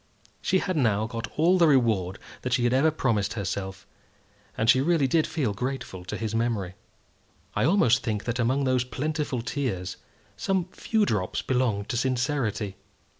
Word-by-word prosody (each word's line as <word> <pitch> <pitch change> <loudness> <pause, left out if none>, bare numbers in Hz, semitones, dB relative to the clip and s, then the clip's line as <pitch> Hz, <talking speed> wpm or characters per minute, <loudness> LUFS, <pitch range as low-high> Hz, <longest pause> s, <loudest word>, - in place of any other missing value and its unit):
She 190 - +2
had 185 -1 -1
now 110 -6 +2
got 115 0 -5
all 175 +4 +4
the 170 - +6
reward 110 - +2 0.2
that 125 - -2
she 125 -1 +2
had 120 0 +2
ever 140 +5 +4
promised 115 -9 0
herself, 95 -2 -4 0.7
and 110 - 0
she 130 +3 +6
really 160 -1 +3
did 155 +4 +2
feel 130 -10 -1
grateful 125 -5 -4
to - - -4
his 110 -1 -3
memory. 115 -5 -1 0.8
I - - +2
almost 125 - +4
think 105 -2 -2
that 120 +1 -2
among 130 +4 +2
those 130 -2 +2
plentiful 140 -1 -2
tears 110 -8 -3 0.4
some 190 -3 0
few 220 -2 +1
drops 100 - -1
belonged 120 -6 0
to 120 - -1
sincerity. 125 -6 -1
120 Hz, 165 wpm, -26 LUFS, 105-140 Hz, 0.8 s, the